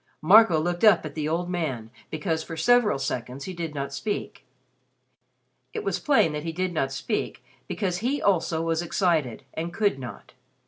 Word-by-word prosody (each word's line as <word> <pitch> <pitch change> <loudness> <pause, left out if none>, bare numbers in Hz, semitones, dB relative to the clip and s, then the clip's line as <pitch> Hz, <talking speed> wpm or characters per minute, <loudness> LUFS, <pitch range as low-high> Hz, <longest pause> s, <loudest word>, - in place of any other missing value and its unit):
Marco 190 -1 +7
looked 175 +4 -2
up 205 -7 +6
at 150 - -6
the 155 0 -2
old 170 +2 -1
man 140 -11 -3 0.2
because 160 +1 -2
for 165 0 -7
several 235 - +4
seconds 135 0 -4
he 185 - -5
did 165 -3 -5
not 140 0 -4
speak. 205 +8 -4 1.3
It 440 -2 -4
was 405 - -1
plain 270 - +3
that 150 - -3
he 165 +1 -4
did 185 +2 -2
not 135 -4 0
speak - - -3 0.2
because 185 -4 -2
he 260 +7 0
also 165 -4 +1
was 165 0 0
excited, 160 - 0
and 165 +2 -4
could 200 -7 +1
not. 120 -6 -9
165 Hz, 175 wpm, -26 LUFS, 150-185 Hz, 1.3 s, Marco